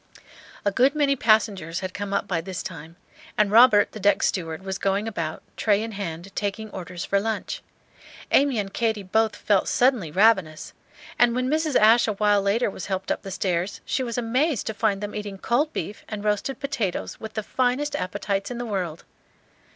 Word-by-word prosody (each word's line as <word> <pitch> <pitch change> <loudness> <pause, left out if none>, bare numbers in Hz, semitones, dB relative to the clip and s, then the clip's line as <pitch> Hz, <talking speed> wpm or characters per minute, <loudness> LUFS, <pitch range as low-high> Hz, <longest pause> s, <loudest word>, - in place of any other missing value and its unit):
A 200 - +3
good 260 +8 +3
many 285 -2 +3
passengers 205 - +1
had 185 -1 -5
come 205 -1 -5
up - - -1
by 170 -3 -1
this 185 0 -5
time; 165 -1 -8 0.4
and 210 -1 +3
Robert, 225 -2 +6
the 215 - -8
deck 205 +1 +3
steward, 165 -2 -1
was 190 0 -4
going 200 +2 0
about, 165 -7 -4
tray 210 -1 +2
in 225 - -5
hand, 190 -2 -6
taking 210 +1 -3
orders 180 -1 -6
for 200 - +2
lunch. 220 +1 -3 0.7
Amy 275 -3 +4
and 200 -2 -3
Katy 220 -3 0
both 220 +3 +1
felt 200 -3 +1
suddenly 245 - +2
ravenous; 185 -3 +2 0.5
and 240 -1 +4
when 255 +1 0
Mrs. 310 -2 0
Ashe 225 +3 +6
awhile 205 -1 +2
later 200 +5 +1
was 190 - -7
helped 190 -1 -2
up - - -1
the 195 - -8
stairs, 185 0 -2
she - - -1
was 235 -2 -3
amazed 250 +3 0
to 220 - -3
find 210 -2 0
them 205 0 -5
eating 205 -2 -5
cold 265 +10 +1
beef 205 - -5
and 210 -1 -5
roasted 210 +6 -1
potatoes, 270 -10 -3
with 220 - -8
the 215 - -2
finest 260 +6 0
appetites 200 -2 -2
in 245 - -5
the 245 - -4
world. 185 -7 -3
205 Hz, 190 wpm, -24 LUFS, 190-235 Hz, 0.7 s, Robert